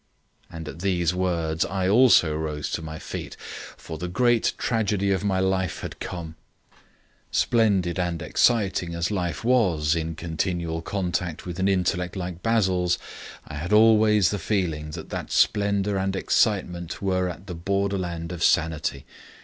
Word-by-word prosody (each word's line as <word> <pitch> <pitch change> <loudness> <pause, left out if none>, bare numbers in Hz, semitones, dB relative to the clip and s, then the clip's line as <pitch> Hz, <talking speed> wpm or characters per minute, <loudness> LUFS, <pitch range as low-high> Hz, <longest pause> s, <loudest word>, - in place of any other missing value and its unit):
And 80 -1 -8
at 80 - -8
these 90 -2 +1
words 85 -3 0
I 95 0 -1
also 105 -8 +5
rose 75 -2 -3
to - - -2
my 80 0 -6
feet, - - -7 0.4
for 80 -2 -8
the 90 - -3
great 120 +5 +2
tragedy 105 -4 0
of 95 0 0
my 95 -2 +1
life 95 -1 0
had - - -7
come. 85 -3 -6 1.0
Splendid 100 -7 +2
and 85 -2 -1
exciting 95 -7 +1
as 85 +4 -1
life 90 -2 -2
was 90 -12 +3
in 80 0 -3
continual 85 0 -2
contact 90 -3 -3
with 90 0 -6
an 95 - +2
intellect 90 -1 0
like 90 -2 -5
Basil's, 95 -6 +2 0.5
I 75 - -7
had 85 +6 -4
always 105 -2 +5
the 105 - -2
feeling 80 -6 -1
that 80 - -9
that - - -5
splendour 100 -1 +2
and 95 0 -1
excitement 90 -5 0
were 95 -1 +1
on 90 0 -8
the 95 - -6
borderland 90 -2 -2
of 85 -2 -4
sanity. 80 -4 +1
90 Hz, 150 wpm, -25 LUFS, 85-100 Hz, 1.0 s, also